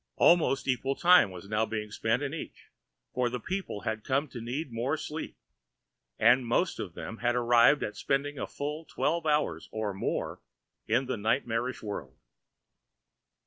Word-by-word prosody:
Almost 165 -6 +4
equal 130 +1 0
time 180 - +6
was 90 +1 -10
now 105 +1 0 0.2
spent 115 +5 0
in 140 0 -3
each, 165 - -8 0.4
for 125 -1 +1
the 125 +1 -3
people 185 - -4
had 110 +2 -3
come 140 +3 0
to 120 - -7
need 130 +5 -4
more 125 +7 -1
sleep 155 +1 -6 0.8
and 120 +3 +5
most 125 +10 0
of 90 -5 -5
them 115 - -6
had 120 +1 +1
arrived 120 +3 +5
at 105 - -4
spending 140 +5 -1
a - - -3
full 150 +3 -4
twelve 165 +1 -1
hours 150 - 0
or 110 -2 -2
more 95 - -3 0.5
in 120 +4 +2
the 130 -2 -2
nightmarish 115 +2 -1
world. 75 -11 -6
125 Hz, 155 wpm, -29 LUFS, 110-145 Hz, 0.8 s, time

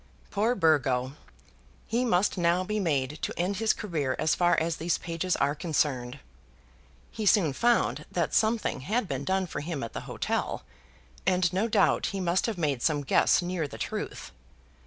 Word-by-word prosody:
Poor 220 +4 +1
Burgo! 135 - +2 0.7
He 235 +3 0
must 190 -3 +2
now 175 0 +2
be 210 +3 -2
made 150 -5 -1
to - - -3
end 185 +3 0
his 225 +1 +2
career 155 -11 -2
as 155 0 +2
far 175 -1 +3
as 165 0 -1
these 170 +1 0
pages 170 +1 -2
are 140 +1 +1
concerned. 140 -5 -1 0.9
He 215 -2 -3
soon 175 -8 +4
found 240 - +1
that - - -1
something 220 -8 +1
had 210 - -1
been 135 -3 -3
done 190 0 +1
for 160 - -5
him 150 -2 -4
at 115 - -6
the - - -4
hotel, - - -2 0.6
and 180 -2 +2
no 200 +5 +1
doubt 205 -4 +2
he 195 - -3
must 180 +2 +1
have 225 -4 -3
made 145 -7 -1
some 145 0 +1
guess 140 - +3
near 175 -3 -2
the - - -10
truth. - - -5
175 Hz, 175 wpm, -28 LUFS, 145-195 Hz, 0.9 s, soon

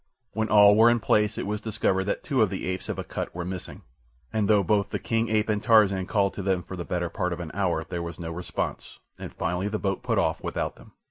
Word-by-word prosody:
When 110 0 -1
all 105 -1 +7
were 115 +2 +7
in 120 0 +3
place 105 -2 +2
it - - -3
was 105 +1 -3
discovered 100 -3 0
that 100 - -2
two 135 -5 +1
of 110 - +4
the 95 - -4
apes 95 +1 -4
of - - -3
Akut - - -5
were 90 -1 -4
missing, 90 -1 -7 0.5
and 110 -2 +1
though 105 -1 +4
both 100 +3 +1
the - - -2
king 115 0 -1
ape 110 0 +1
and 105 -1 0
Tarzan 105 -5 +4
called 100 -3 +1
to - - -5
them 95 -2 0
for 95 - -8
the 85 - -5
better 85 0 -2
part 90 -1 -2
of 85 - -6
an 85 -2 -6
hour, 90 -4 0
there 85 +1 -5
was 85 +2 -6
no 85 -1 -5
response, 90 +2 -5 0.2
and - - -7
finally 90 +4 -2
the 110 +1 -2
boat 95 -3 -2
put - - -1
off - - +1
without - - -3
them. - - -17
100 Hz, 255 wpm, -26 LUFS, 90-105 Hz, 0.5 s, all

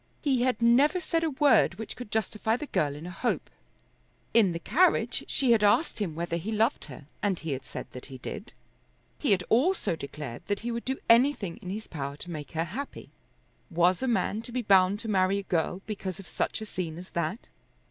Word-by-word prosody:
He 270 -5 +2
had 250 -1 +1
never 270 +9 +5
said 330 -1 0
a 325 - +2
word 280 - +4
which 220 +3 -6
could 245 -4 -8
justify 220 +1 0
the 300 - -5
girl 145 - 0
in 150 +3 -8
a 180 - -6
hope. 190 - -2 0.8
In 215 -6 +5
the 170 - -2
carriage 300 - +2
she 260 -3 +2
had 220 -2 +4
asked 225 +10 +3
him 180 -7 -2
whether 170 0 -2
he 190 +6 -4
loved 225 +5 +1
her, 145 - -11 0.2
and 200 -3 +1
he 160 -2 -5
had 130 -1 -3
said - - -6
that 125 - -9
he 135 -1 -9
did. 210 - -7 0.7
He 285 - 0
had 185 -3 +3
also 275 - +2
declared 140 -5 -7
that 205 -1 -1
he 240 +2 -3
would 235 0 -4
do 265 +1 -1
anything 230 -6 +4
in 180 - -8
his 215 +3 -4
power 140 -3 -5
to 175 +4 -8
make 150 -2 -7
her 165 +1 0
happy. 260 - -7 0.6
Was 175 +2 +3
a 260 - 0
man 215 -1 0
to 235 - -9
be 250 0 -2
bound 195 -1 +5
to 230 - -6
marry 195 -1 +2
a 200 - -3
girl 180 +1 -1
because 195 -4 -4
of 195 - -10
such - - -2
a - - -4
scene 170 -6 -4
as 180 +2 -10
that? 170 +6 -3
205 Hz, 220 wpm, -28 LUFS, 170-235 Hz, 0.8 s, never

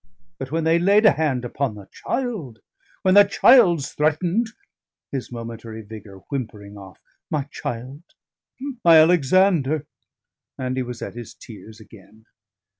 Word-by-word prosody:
But 135 0 -6
when 165 +1 -1
they 165 +1 +3
laid 200 +5 +4
a 215 - +8
hand 135 -5 -1
upon 125 -1 -3
the 100 -2 -12
child, 205 - -4 0.5
when 185 -2 +3
the 205 +1 +9
child's 185 - +4
threatened" 170 +9 0 0.6
his 135 -3 -5
momentary 115 -1 -8
vigour 100 -2 -12
whimpering 110 -7 -6
off 95 -2 -13 0.3
"my 150 -3 -1
child, 125 +5 -6 0.8
my 165 -2 +7
Alexander!" 155 -2 +3 0.7
and 130 -1 -3
he 130 - -1
was 125 -1 -6
at - - -7
his 120 -1 -10
tears 110 0 -13
again. 110 0 -18
135 Hz, 135 wpm, -22 LUFS, 115-170 Hz, 0.8 s, the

